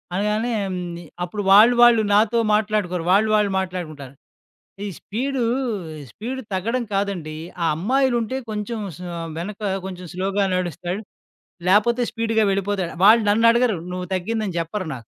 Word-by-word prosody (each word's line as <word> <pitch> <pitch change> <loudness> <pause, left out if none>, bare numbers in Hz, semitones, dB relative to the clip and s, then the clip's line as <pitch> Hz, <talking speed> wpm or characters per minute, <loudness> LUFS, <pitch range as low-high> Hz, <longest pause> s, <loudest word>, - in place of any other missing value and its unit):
అనగానే 210 +4 0
హ్మ్, 190 -2 -3 0.2
ని 170 - -8 0.2
అప్పుడు 195 +4 -4
వాళ్ళు, 215 +5 +8
వాళ్ళు 240 -2 +7
నాతో 215 +3 +3 0.2
మాట్లాడుకోరు, 210 -5 0
వాళ్ళు, 210 +3 +4
వాళ్ళు 210 -2 +2
మాట్లాడుకుంటారు. 160 -8 -6 0.7
ఈ - - -3
స్పీడు, 255 +4 -2 0.7
స్పీడు 255 - -5
తగ్గడం 230 +7 -1
కాదండి, 195 -6 -2 0.3
ఆ - - +2
అమ్మాయిలుంటే 245 - +1
కొంచెం 215 +2 -4 0.2
స - - -17 0.4
వెనక 200 +5 -6 0.2
కొంచెం 185 -1 -7
స్లోగా 195 +2 0
నడుస్తాడు. 180 +2 -3 0.7
లేకపోతే 230 +5 +4
స్పీడుగా 225 -1 +1
వెళ్ళిపోతాడు. 195 -2 -1
వాళ్ళు 220 +2 +7
నన్నడగరు, 230 0 +4 0.2
నువ్వు 180 0 -4
తగ్గిందని 200 0 -2
చెప్పరు 170 +3 -3
నాకు. 120 - -11
205 Hz, 130 wpm, -22 LUFS, 185-225 Hz, 0.7 s, వాళ్ళు